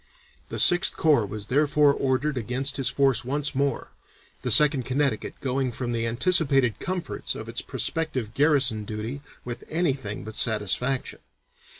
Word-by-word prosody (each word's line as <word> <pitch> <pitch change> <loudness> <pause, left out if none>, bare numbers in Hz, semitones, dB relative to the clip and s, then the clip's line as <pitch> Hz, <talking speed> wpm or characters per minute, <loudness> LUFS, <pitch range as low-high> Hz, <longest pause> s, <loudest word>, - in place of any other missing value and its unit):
The - - -4
Sixth 175 +1 +4
Corps 145 -10 +3
was 105 0 -7
therefore 145 +2 +3
ordered 135 +2 -1
against 130 +4 -2
his 135 - +2
force 135 -3 +2
once 145 +4 -2
more, 140 -1 -2 0.5
the - - -2
Second 145 -3 +5
Connecticut 130 -2 -1
going 130 -1 -1
from 120 0 -4
the 115 -1 -1
anticipated 135 - +2
comforts 185 -1 -4
of - - -8
its - - -4
prospective 135 -10 -3
garrison 135 -7 +2
duty 110 +6 -6 0.2
with 120 -1 -6
anything 140 -11 -2
but 110 0 -9
satisfaction. 115 +4 +1
135 Hz, 140 wpm, -25 LUFS, 120-145 Hz, 0.5 s, Second